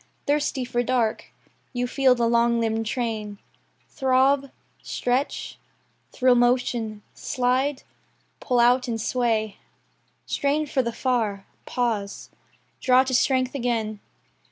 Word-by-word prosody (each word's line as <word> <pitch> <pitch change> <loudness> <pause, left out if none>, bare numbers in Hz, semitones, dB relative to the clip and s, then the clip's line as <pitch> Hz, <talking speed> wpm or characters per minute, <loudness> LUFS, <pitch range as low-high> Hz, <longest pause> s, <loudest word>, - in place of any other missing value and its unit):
Thirsty 285 -3 0
for 240 0 -1
dark, 240 -3 0 0.5
you 245 0 -1
feel 260 0 +3
the 235 -1 +1
long 235 0 +3
limbed 225 -1 -1
train 220 -4 -3 0.5
Throb, 270 +1 +2 0.3
stretch, 255 +3 -2 0.5
thrill 255 -1 +3
motion, 240 -3 +1
slide, 260 +2 -1 0.6
pull 250 -2 0
out 250 +2 +4
and 230 -2 -2
sway, 220 -3 0 0.7
Strain 295 +2 0
for 275 -2 0
the 235 -2 -2
far, 225 -6 -1 0.2
pause, 220 -5 -2 0.5
draw 255 0 +4
to 260 0 -4
strength 255 0 +2
again. 230 -5 -2
245 Hz, 110 wpm, -24 LUFS, 230-260 Hz, 0.7 s, out